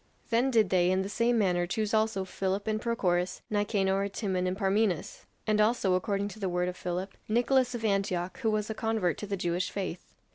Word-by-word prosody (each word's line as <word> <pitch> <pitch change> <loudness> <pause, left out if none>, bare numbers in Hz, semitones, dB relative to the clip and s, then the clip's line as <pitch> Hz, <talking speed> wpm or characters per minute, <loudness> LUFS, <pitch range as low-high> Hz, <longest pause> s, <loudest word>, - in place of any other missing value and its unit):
Then 240 +4 +3
did 220 -7 +3
they 180 -1 +4
in 185 +1 +2
the 195 - -5
same 235 +3 +2
manner 180 -4 +2
choose 215 +3 -1
also 220 -3 +1
Philip 190 +1 -2
and 215 0 -1
Prochorus, 185 -7 0
Nicanor, 200 -1 +1
Timon, 190 -3 -1
and 185 +1 -2
Parmenas; 195 -3 0 0.2
and 215 -1 +3
also, 210 -3 +2
according 200 +2 0
to 215 - -11
the 195 -3 -1
word 180 0 0
of 180 - -6
Philip, 180 +2 -4
Nicolas 245 +2 +2
of 225 -1 -3
Antioch, 195 0 0
who 230 -4 +1
was 215 -1 0
a - - -1
convert 220 -7 0
to 210 - -5
the 200 0 -2
Jewish 175 0 -1
faith. 185 -3 -4
200 Hz, 205 wpm, -29 LUFS, 185-220 Hz, 0.2 s, they